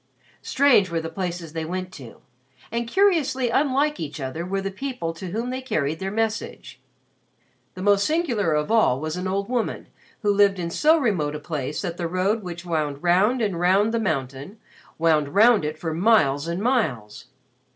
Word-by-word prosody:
'" -, -, -30 dB
Strange 255 Hz, -9 st, +3 dB
were 170 Hz, -1 st, -1 dB
the 165 Hz, 0 st, -5 dB
places 175 Hz, -4 st, -5 dB
they 160 Hz, -1 st, -3 dB
went 185 Hz, +3 st, -4 dB
to 130 Hz, -9 st, -12 dB, 0.5 s
and 235 Hz, +1 st, -2 dB
curiously 290 Hz, -8 st, +2 dB
unlike 285 Hz, +3 st, +1 dB
each 150 Hz, -1 st, -5 dB
other 135 Hz, +5 st, -4 dB
were 195 Hz, +2 st, -2 dB
the 195 Hz, 0 st, -3 dB
people 250 Hz, -7 st, -4 dB
to 175 Hz, +3 st, -8 dB
whom 230 Hz, +6 st, -3 dB
they 260 Hz, +1 st, -4 dB
carried 155 Hz, -, -2 dB
their 190 Hz, -, -3 dB
message. 215 Hz, -10 st, -3 dB, 0.9 s
The 185 Hz, -, -6 dB
most 200 Hz, 0 st, +4 dB
singular 245 Hz, -, 0 dB
of 150 Hz, +6 st, -1 dB
all 215 Hz, -, +3 dB
was 155 Hz, +1 st, -4 dB
an 180 Hz, +1 st, -3 dB
old 195 Hz, +1 st, -2 dB
woman 240 Hz, -2 st, -3 dB, 0.3 s
who 205 Hz, -1 st, +3 dB
lived 200 Hz, -1 st, +4 dB
in 170 Hz, -2 st, -4 dB
so 310 Hz, -, +4 dB
remote 180 Hz, -, 0 dB
a -, -, -5 dB
place 150 Hz, -1 st, -4 dB
that 175 Hz, -2 st, -4 dB
the 170 Hz, -, -2 dB
road 185 Hz, +6 st, 0 dB
which 175 Hz, -2 st, -7 dB
wound 150 Hz, -4 st, -2 dB
round 205 Hz, +8 st, +3 dB
and 195 Hz, -5 st, -1 dB
round 195 Hz, +5 st, +3 dB
the 230 Hz, -, +1 dB
mountain, 140 Hz, -, -3 dB, 0.4 s
wound 155 Hz, -1 st, +1 dB
round 220 Hz, -2 st, +5 dB
it 150 Hz, +1 st, -3 dB
for 160 Hz, -1 st, -4 dB
miles 165 Hz, -6 st, +3 dB
and 170 Hz, +4 st, -3 dB
miles. 150 Hz, -, -1 dB
185 Hz, 185 wpm, -23 LUFS, 160-225 Hz, 0.9 s, round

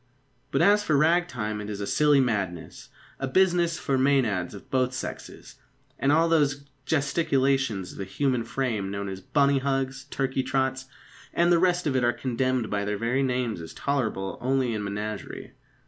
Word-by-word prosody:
But, 165 Hz, -, +2 dB
as 205 Hz, +3 st, +5 dB
for 155 Hz, -7 st, +2 dB
rag 165 Hz, +4 st, +3 dB
time, 105 Hz, -7 st, -4 dB
it 105 Hz, -, -6 dB
is 100 Hz, -1 st, -5 dB
a 100 Hz, -, -3 dB
silly 150 Hz, +4 st, +3 dB
madness, 100 Hz, -9 st, -2 dB, 0.3 s
a 135 Hz, -, -2 dB
business 175 Hz, +2 st, +2 dB
for 135 Hz, -1 st, 0 dB
Mænads 120 Hz, -10 st, +1 dB
of 100 Hz, -, -13 dB
both 130 Hz, -1 st, +1 dB
sexes; 125 Hz, -, -7 dB, 0.4 s
and 135 Hz, -, +2 dB
all 165 Hz, +3 st, +4 dB
those 145 Hz, -4 st, +1 dB, 0.2 s
gesticulations 135 Hz, -, +1 dB
of -, -, -13 dB
the -, -, -2 dB
human 125 Hz, +4 st, 0 dB
frame 115 Hz, -5 st, -2 dB
known 100 Hz, 0 st, -4 dB
as 95 Hz, -1 st, -6 dB
bunny 140 Hz, +6 st, +2 dB
hugs, 135 Hz, 0 st, -2 dB
turkey 135 Hz, -1 st, -1 dB
trots, 130 Hz, 0 st, -1 dB, 0.5 s
and 170 Hz, +1 st, +3 dB
the 170 Hz, -, +5 dB
rest 180 Hz, 0 st, +2 dB
of 140 Hz, -3 st, 0 dB
it 130 Hz, -, +2 dB
are 120 Hz, 0 st, +3 dB
condemned 130 Hz, -1 st, -1 dB
by 100 Hz, 0 st, 0 dB
their 105 Hz, 0 st, -2 dB
very 120 Hz, +5 st, 0 dB
names 125 Hz, -7 st, -1 dB
as 80 Hz, 0 st, -10 dB
tolerable 110 Hz, -9 st, -2 dB
only 130 Hz, -1 st, +1 dB
in 105 Hz, -1 st, -3 dB
the 100 Hz, -, -3 dB
menagerie. 105 Hz, +1 st, -5 dB
130 Hz, 180 wpm, -26 LUFS, 105-140 Hz, 0.5 s, as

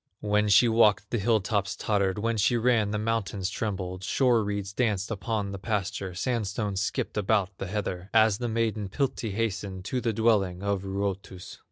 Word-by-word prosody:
When 105 Hz, 0 st, +2 dB
she 105 Hz, +5 st, +6 dB
walked 105 Hz, -3 st, +3 dB
the 120 Hz, -, 0 dB
hill 110 Hz, +1 st, +2 dB
tops 100 Hz, -1 st, -1 dB
tottered, 100 Hz, -3 st, 0 dB
When 115 Hz, +2 st, 0 dB
she 110 Hz, +3 st, +2 dB
ran 115 Hz, -3 st, +2 dB
the 105 Hz, -, -1 dB
mountains 105 Hz, -3 st, -1 dB
trembled; 95 Hz, -3 st, -4 dB
Shore 120 Hz, 0 st, +2 dB
reeds 100 Hz, -1 st, -3 dB
danced 105 Hz, -3 st, 0 dB
upon 105 Hz, -1 st, -2 dB
the 100 Hz, -, -6 dB
pasture, 100 Hz, -3 st, -3 dB
Sandstones 105 Hz, -2 st, -1 dB
skipped 100 Hz, -, -2 dB
about 100 Hz, -2 st, +1 dB
the 95 Hz, -, -4 dB
heather 95 Hz, -2 st, -4 dB
As 110 Hz, -2 st, +4 dB
the 120 Hz, -, -2 dB
maiden, 110 Hz, -3 st, -1 dB
Piltti, 130 Hz, -3 st, -2 dB
hastened 100 Hz, -3 st, -3 dB
To 125 Hz, +5 st, -2 dB
the 115 Hz, -1 st, 0 dB
dwelling 100 Hz, -5 st, +1 dB
of 100 Hz, -1 st, 0 dB
Ruotus. 95 Hz, -1 st, -4 dB
105 Hz, 175 wpm, -27 LUFS, 95-115 Hz, -, she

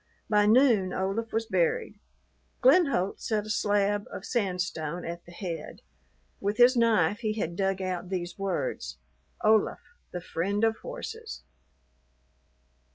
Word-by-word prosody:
By 210 Hz, -1 st, +4 dB
noon 220 Hz, -6 st, +4 dB
Olaf 195 Hz, +4 st, -2 dB
was 225 Hz, 0 st, 0 dB
buried. 475 Hz, -, 0 dB, 0.6 s
Glenholdt 270 Hz, -, +4 dB
set 215 Hz, -2 st, -1 dB
a 215 Hz, -, -4 dB
slab 205 Hz, -1 st, +1 dB
of -, -, -7 dB
sandstone 180 Hz, -6 st, -2 dB
at 170 Hz, +1 st, -6 dB
the -, -, -11 dB
head. 175 Hz, -2 st, -6 dB, 0.6 s
With 205 Hz, +2 st, -1 dB
his 245 Hz, +1 st, +7 dB
knife 220 Hz, -5 st, +3 dB
he 215 Hz, -2 st, -1 dB
had 170 Hz, -6 st, -3 dB
dug 195 Hz, 0 st, 0 dB
out 180 Hz, -1 st, -3 dB
these 175 Hz, -2 st, -3 dB
words 180 Hz, -, -3 dB, 0.5 s
"Olaf. 215 Hz, 0 st, +4 dB, 0.3 s
The 180 Hz, -, -5 dB
friend 195 Hz, +5 st, -2 dB
of 225 Hz, 0 st, +3 dB
horses." 465 Hz, -2 st, -7 dB
205 Hz, 130 wpm, -28 LUFS, 180-230 Hz, 0.6 s, his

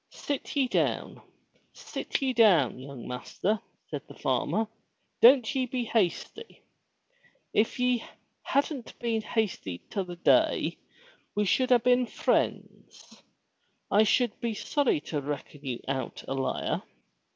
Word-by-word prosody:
"Sit 285 Hz, 0 st, -4 dB
ye 275 Hz, -2 st, +3 dB
down! -, -, -1 dB, 0.5 s
Sit -, -, -4 dB
ye 260 Hz, -1 st, +1 dB
down, 180 Hz, -, +4 dB
young 135 Hz, -2 st, -9 dB
master," 190 Hz, -, -2 dB, 0.3 s
said -, -, -3 dB
the -, -, -12 dB
farmer. 225 Hz, -, 0 dB, 0.6 s
"Don't 250 Hz, +2 st, +7 dB
ye 260 Hz, -2 st, 0 dB
be 250 Hz, 0 st, -2 dB
hasty. 230 Hz, -, -2 dB, 0.9 s
If 220 Hz, +4 st, +1 dB
ye 250 Hz, -2 st, +2 dB, 0.4 s
hadn't 280 Hz, -3 st, -1 dB
been 230 Hz, -2 st, -1 dB
hasty 210 Hz, -, -2 dB
t' 200 Hz, -, -7 dB
other 180 Hz, -2 st, -3 dB
day 310 Hz, -, +2 dB, 0.6 s
we 210 Hz, 0 st, +2 dB
should 255 Hz, +6 st, +2 dB
a 250 Hz, -, +8 dB
been 250 Hz, +1 st, +3 dB
friends. -, -, -2 dB, 0.7 s
I 205 Hz, -, +6 dB
should 235 Hz, +1 st, +2 dB
be 230 Hz, -2 st, -2 dB
sorry 275 Hz, -, +1 dB
to 150 Hz, -1 st, -3 dB
reckon 145 Hz, 0 st, -6 dB
you 125 Hz, -4 st, -4 dB
out 135 Hz, -1 st, -3 dB
a -, -, -2 dB
liar. 135 Hz, -1 st, -1 dB
225 Hz, 130 wpm, -28 LUFS, 155-250 Hz, 0.9 s, a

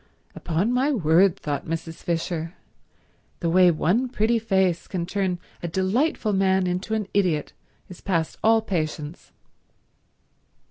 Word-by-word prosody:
"Upon 180 Hz, +8 st, -1 dB
my 265 Hz, +4 st, +2 dB
word," 180 Hz, -, +3 dB
thought 145 Hz, -3 st, -4 dB
Mrs. 165 Hz, 0 st, -4 dB
Fisher, 165 Hz, 0 st, -3 dB, 0.8 s
"the 170 Hz, -2 st, -1 dB
way 180 Hz, +1 st, +6 dB
one 190 Hz, +10 st, +1 dB
pretty 230 Hz, -1 st, +1 dB
face 190 Hz, -5 st, +1 dB
can 175 Hz, -3 st, -3 dB
turn 185 Hz, -1 st, -1 dB, 0.2 s
a 175 Hz, -, -3 dB
delightful 210 Hz, -, 0 dB
man 190 Hz, -1 st, +2 dB
into 180 Hz, +5 st, -2 dB
an 210 Hz, -3 st, -2 dB
idiot 180 Hz, -7 st, +1 dB, 0.3 s
is 180 Hz, -, -12 dB
past 165 Hz, -5 st, -1 dB
all 225 Hz, 0 st, +4 dB
patience." 155 Hz, -4 st, -4 dB
185 Hz, 130 wpm, -24 LUFS, 165-210 Hz, 0.8 s, way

